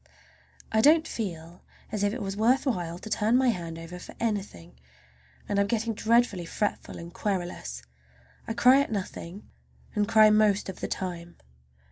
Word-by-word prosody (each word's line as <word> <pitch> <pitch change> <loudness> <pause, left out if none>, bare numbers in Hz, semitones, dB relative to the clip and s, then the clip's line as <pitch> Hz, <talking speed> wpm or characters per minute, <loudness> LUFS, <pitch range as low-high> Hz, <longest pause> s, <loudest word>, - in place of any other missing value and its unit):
I 220 - +3
don't 315 +5 +5
feel 170 -5 -6 0.3
as 210 -1 -2
if 205 0 +2
it 235 0 -4
was 195 0 -4
worth 235 +7 +2
while 175 -10 -2
to 195 - -10
turn 220 +2 +2
my 260 -1 +3
hand 170 -6 -3
over 165 +2 -8
for - - -11
anything, 195 - -4 0.7
and 200 - 0
I'm 200 - +2
getting 225 +1 -1
dreadfully 220 -5 +2
fretful 205 +4 -3
and 170 0 -9
querulous. 175 - -3 0.6
I - - -2
cry 250 +6 +6
at 280 - -3
nothing, 195 -1 -5 0.5
and 210 -2 +1
cry 215 -1 +6
most 210 -2 +3
of 190 - -7
the - - -3
time. 175 -2 -5
205 Hz, 165 wpm, -27 LUFS, 175-225 Hz, 0.7 s, cry